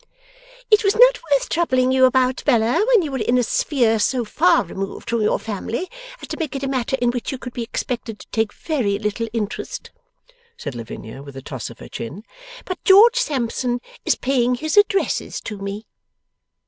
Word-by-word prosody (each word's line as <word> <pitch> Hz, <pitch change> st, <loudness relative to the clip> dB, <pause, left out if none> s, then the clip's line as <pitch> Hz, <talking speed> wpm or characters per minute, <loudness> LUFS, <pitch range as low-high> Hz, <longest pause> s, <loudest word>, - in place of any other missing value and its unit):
'It 425 Hz, +1 st, +6 dB
was 395 Hz, 0 st, +2 dB
not -, -, +6 dB
worth 275 Hz, -2 st, +3 dB
troubling 255 Hz, -6 st, +1 dB
you 260 Hz, 0 st, +5 dB
about, 255 Hz, 0 st, +2 dB
Bella, 240 Hz, -, +3 dB
when 475 Hz, -7 st, +5 dB
you 300 Hz, -, -4 dB
were 265 Hz, -, -2 dB
in 240 Hz, +2 st, +2 dB
a 250 Hz, -, +3 dB
sphere 230 Hz, -2 st, +1 dB
so 245 Hz, +3 st, +1 dB
far 335 Hz, +8 st, +3 dB
removed 195 Hz, +6 st, -6 dB
from 235 Hz, -1 st, +1 dB
your 210 Hz, -, +2 dB
family 225 Hz, -, -4 dB, 0.3 s
as -, -, -9 dB
to -, -, -4 dB
make 310 Hz, -5 st, -4 dB
it 275 Hz, -, -4 dB
a -, -, 0 dB
matter 265 Hz, 0 st, -1 dB
in 245 Hz, -1 st, +2 dB
which 245 Hz, +2 st, -4 dB
you 265 Hz, -, -4 dB
could 250 Hz, -1 st, -8 dB
be 240 Hz, -, -4 dB
expected 230 Hz, -1 st, -4 dB
to -, -, -14 dB
take 220 Hz, -2 st, 0 dB
very 245 Hz, -12 st, -1 dB
little 210 Hz, +2 st, -2 dB
interest,' 230 Hz, -, -4 dB, 0.7 s
said 145 Hz, -, -5 dB
Lavinia 115 Hz, +1 st, -8 dB
with 140 Hz, -1 st, -11 dB
a -, -, -6 dB
toss -, -, -6 dB
of -, -, -12 dB
her -, -, -11 dB
chin; 150 Hz, -, -7 dB, 0.4 s
'but 370 Hz, -, -5 dB
George 445 Hz, +6 st, +7 dB
Sampson 250 Hz, -, -1 dB, 0.2 s
is -, -, +2 dB
paying 250 Hz, -2 st, +1 dB
his 310 Hz, +5 st, -2 dB
addresses 410 Hz, -1 st, +2 dB
to 210 Hz, -2 st, -7 dB
me. 200 Hz, +2 st, -5 dB
250 Hz, 195 wpm, -21 LUFS, 220-305 Hz, 0.7 s, George